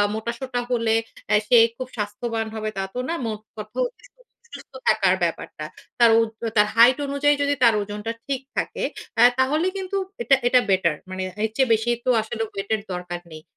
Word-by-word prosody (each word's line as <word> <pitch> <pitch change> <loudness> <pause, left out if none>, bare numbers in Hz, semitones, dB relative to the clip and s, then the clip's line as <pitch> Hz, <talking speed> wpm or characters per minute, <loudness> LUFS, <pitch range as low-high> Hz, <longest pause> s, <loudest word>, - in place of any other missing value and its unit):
মোটাসোটা 235 +3 -4
হলে 230 -2 +2 0.3
অ্যা 210 0 +4
সে 240 - +6 0.2
খুব 255 -1 -5
স্বাস্থ্যবান 225 +2 -3
হবে 215 0 -3
তা 195 - -1
তো 250 - -4
না, 335 - 0
মোটকথা 215 - -7 0.7
সুস্থ - - -11
থাকার 195 -3 +4
ব্যাপারটা। 160 -2 -3 0.3
তার 235 -1 +7
উর্ধ 225 -1 -2 0.2
তার 210 -1 +5
হাইট 240 +3 +7
অনুযায়ী 285 +1 +2
যদি 285 0 +2
তার 230 -2 +6
ওজনটা 210 +2 -4
ঠিক 275 -2 -2 0.2
থাকে, - - -2 0.4
আ - - +6 0.2
তাহলে 300 +7 +2
কিন্তু 385 +1 -3 0.2
এটা, 275 -13 +5
এটা 250 +1 +5
বেটার 185 -5 +2
মানে 185 0 -4 0.2
এর 220 - +1
চেয়ে 265 -2 +2
বেশি 225 +2 +1
তো - - +1
আসলে 220 +1 -5
ওয়েটের 205 +2 -2
দরকার 180 0 -5
নেই। 155 - -9
225 Hz, 175 wpm, -23 LUFS, 210-255 Hz, 0.7 s, তার